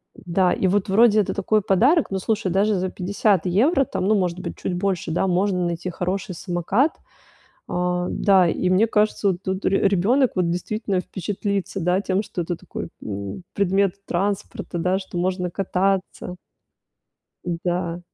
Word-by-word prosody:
Да, 180 Hz, 0 st, +1 dB
и 190 Hz, -, +1 dB
вот 195 Hz, +1 st, +1 dB
вроде 215 Hz, +2 st, +5 dB
это 205 Hz, -, 0 dB
такой 210 Hz, +2 st, +1 dB
подарок, 240 Hz, -, +3 dB
но, 190 Hz, -, -1 dB
слушай, 210 Hz, -1 st, -1 dB
даже 200 Hz, +3 st, +2 dB
за 185 Hz, 0 st, -1 dB
50 195 Hz, 0 st, 0 dB
евро, 255 Hz, -, +3 dB
там, 185 Hz, -, -3 dB
ну, 215 Hz, -, +4 dB
может 180 Hz, -3 st, 0 dB
быть, 180 Hz, -2 st, -6 dB
чуть -, -, -3 dB
больше, 180 Hz, -2 st, -1 dB
да, 175 Hz, +4 st, +1 dB
можно 185 Hz, 0 st, +1 dB
найти 170 Hz, +1 st, -3 dB
хороший 185 Hz, +1 st, -3 dB
самокат. 190 Hz, -, 0 dB, 0.7 s
А, 180 Hz, 0 st, -1 dB
да, 190 Hz, -3 st, +4 dB
и 180 Hz, -, -1 dB
мне 190 Hz, +5 st, +4 dB
кажется, 210 Hz, -1 st, +1 dB
вот 185 Hz, 0 st, -3 dB
тут 190 Hz, +1 st, -3 dB
ре 195 Hz, 0 st, +3 dB
ребёнок 225 Hz, +8 st, +2 dB
вот 180 Hz, -2 st, +1 dB
действительно 190 Hz, +2 st, -2 dB
впечатлится, 200 Hz, +1 st, -3 dB
да, 180 Hz, +3 st, +1 dB
тем, 195 Hz, +1 st, 0 dB
что 180 Hz, -, -5 dB
это 175 Hz, +1 st, -3 dB
такой, -, -, -7 dB, 0.2 s
м, 100 Hz, -, -6 dB
предмет 195 Hz, -1 st, +2 dB
транспорта, 200 Hz, +1 st, -2 dB
да, 180 Hz, +3 st, +1 dB
что 190 Hz, -2 st, -7 dB
можно 180 Hz, 0 st, -1 dB
кататься. 190 Hz, -1 st, -1 dB, 1.3 s
Да. 175 Hz, -1 st, -1 dB
190 Hz, 160 wpm, -23 LUFS, 180-200 Hz, 1.3 s, вроде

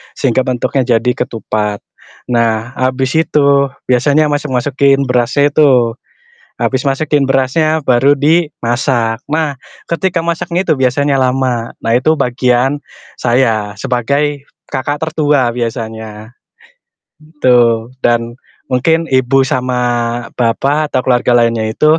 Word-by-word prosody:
sehingga 130 Hz, -1 st, +1 dB
bentuknya 130 Hz, +1 st, -1 dB
jadi 125 Hz, +2 st, 0 dB
ketupat. 105 Hz, -3 st, -3 dB, 0.5 s
Nah, 115 Hz, 0 st, 0 dB
habis 130 Hz, 0 st, 0 dB
itu 140 Hz, -3 st, +2 dB, 0.2 s
biasanya 145 Hz, +4 st, +3 dB
masuk-masukin 140 Hz, -1 st, +1 dB
berasnya 125 Hz, +4 st, +2 dB
itu, 125 Hz, -6 st, +3 dB, 0.7 s
habis 130 Hz, -1 st, 0 dB
masukin 140 Hz, 0 st, +1 dB
berasnya 155 Hz, +4 st, +1 dB
baru 130 Hz, +3 st, +3 dB
dimasak, 130 Hz, -7 st, 0 dB
nah 150 Hz, -3 st, -1 dB, 0.3 s
ketika 170 Hz, +1 st, 0 dB
masaknya 170 Hz, +1 st, -1 dB
itu 160 Hz, -, +2 dB
biasanya 135 Hz, +2 st, +1 dB
lama. 125 Hz, -2 st, -1 dB
Nah 115 Hz, -, 0 dB
itu 155 Hz, +5 st, +2 dB
bagian 125 Hz, +1 st, +1 dB, 0.4 s
saya, 115 Hz, -4 st, +1 dB
sebagai 140 Hz, +4 st, -1 dB, 0.2 s
kakak 145 Hz, +2 st, -2 dB
tertua 150 Hz, -5 st, +1 dB
biasanya, 110 Hz, -2 st, -5 dB, 0.9 s
gitu, 125 Hz, -7 st, +1 dB, 0.2 s
dan 120 Hz, 0 st, +1 dB, 0.4 s
mungkin 160 Hz, +6 st, +1 dB
ibu 130 Hz, +1 st, +3 dB
sama 125 Hz, -1 st, -1 dB, 0.6 s
bapak 140 Hz, +6 st, 0 dB
atau -, -, +2 dB
keluarga 125 Hz, -1 st, +2 dB
lainnya 115 Hz, -2 st, +1 dB
itu 155 Hz, +7 st, +3 dB
130 Hz, 110 wpm, -14 LUFS, 120-145 Hz, 0.9 s, biasanya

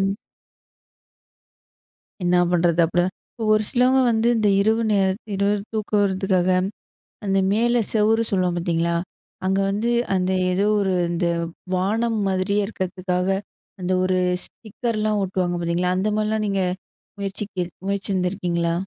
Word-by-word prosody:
ம். 195 Hz, +1 st, +1 dB, 2.1 s
என்னா 175 Hz, 0 st, +3 dB
பண்ணுறது? 170 Hz, -1 st, +3 dB
அப்டிதான் 175 Hz, +2 st, +1 dB, 0.2 s
இப்ப 225 Hz, -, -6 dB
ஒரு 215 Hz, -, +2 dB
சிலவங்க 255 Hz, +2 st, +3 dB
வந்து 225 Hz, +1 st, +2 dB
இந்த 215 Hz, -2 st, +2 dB
இரவு 220 Hz, +3 st, +2 dB
நேரம் 195 Hz, -1 st, +2 dB, 0.2 s
இரவு 200 Hz, +1 st, +2 dB, 0.2 s
தூக்கம் 210 Hz, -1 st, 0 dB
வர்றதுக்காக, 190 Hz, -2 st, +1 dB, 0.8 s
அந்த 195 Hz, 0 st, +2 dB
மேலே 240 Hz, +2 st, +2 dB
செவுறு 220 Hz, +1 st, +3 dB
சொல்வோம் 180 Hz, -2 st, +1 dB
பாத்தீங்களா? 170 Hz, 0 st, 0 dB, 0.5 s
அங்க 190 Hz, +1 st, +2 dB
வந்து, 220 Hz, +4 st, 0 dB, 0.2 s
அந்த 185 Hz, 0 st, +1 dB, 0.2 s
ஏதோ 195 Hz, +3 st, +1 dB
ஒரு 190 Hz, -2 st, +1 dB, 0.2 s
இந்த 175 Hz, +1 st, -1 dB, 0.5 s
வானம் 220 Hz, +5 st, 0 dB
மாதிரியே 190 Hz, +2 st, +1 dB
இருக்கதுக்காக 185 Hz, -2 st, -2 dB, 0.5 s
அந்த 180 Hz, +1 st, -2 dB
ஒரு 185 Hz, 0 st, +1 dB, 0.3 s
ஸ்டிக்கர்லாம் 215 Hz, -1 st, -2 dB
ஓட்டுவாங்க 180 Hz, -2 st, -1 dB
பார்த்தீங்களா? 175 Hz, +2 st, 0 dB
அந்த 195 Hz, +3 st, 0 dB
மாதிரிலாம் 215 Hz, 0 st, 0 dB
நீங்க 195 Hz, -1 st, 0 dB, 0.6 s
முயற்சிக் 195 Hz, -1 st, -4 dB, 0.3 s
முயற்சிந்ருக்கீங்களா? 180 Hz, -3 st, -1 dB
195 Hz, 120 wpm, -22 LUFS, 180-215 Hz, 2.1 s, என்னா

